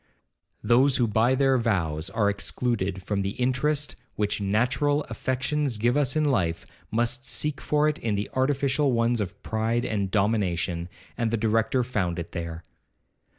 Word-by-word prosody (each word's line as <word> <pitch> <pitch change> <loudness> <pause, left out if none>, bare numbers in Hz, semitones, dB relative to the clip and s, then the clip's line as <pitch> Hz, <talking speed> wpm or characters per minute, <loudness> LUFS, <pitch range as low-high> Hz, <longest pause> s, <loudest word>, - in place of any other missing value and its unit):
Those 130 +3 +4
who 125 - +3
by 115 +4 +2
their 135 -1 +3
vows 90 -7 -1
are 105 +1 +1
excluded 100 -2 -1
from 100 +1 -1
the 100 +1 -3
interest 140 +3 0 0.2
which 105 0 -1
natural 125 +9 +1
affections 130 +2 -1
give 120 +4 +2
us 145 -2 +2
in 155 - +2
life, 85 - 0 0.2
must 120 +3 0
seek 150 0 -1
for 150 0 +2
it 155 - -1
in 110 -3 -1
the 100 +1 -2
artificial 140 +1 +1
ones 115 0 +2
of 95 -1 -5
pride 115 +2 0
and 100 -5 -1
domination, 95 -4 0 0.3
and 115 -1 +1
the 115 - 0
Director 115 +3 +1
found 95 -8 -1
it 85 -1 -5
there. 85 -1 -5
115 Hz, 155 wpm, -26 LUFS, 100-130 Hz, 0.3 s, Those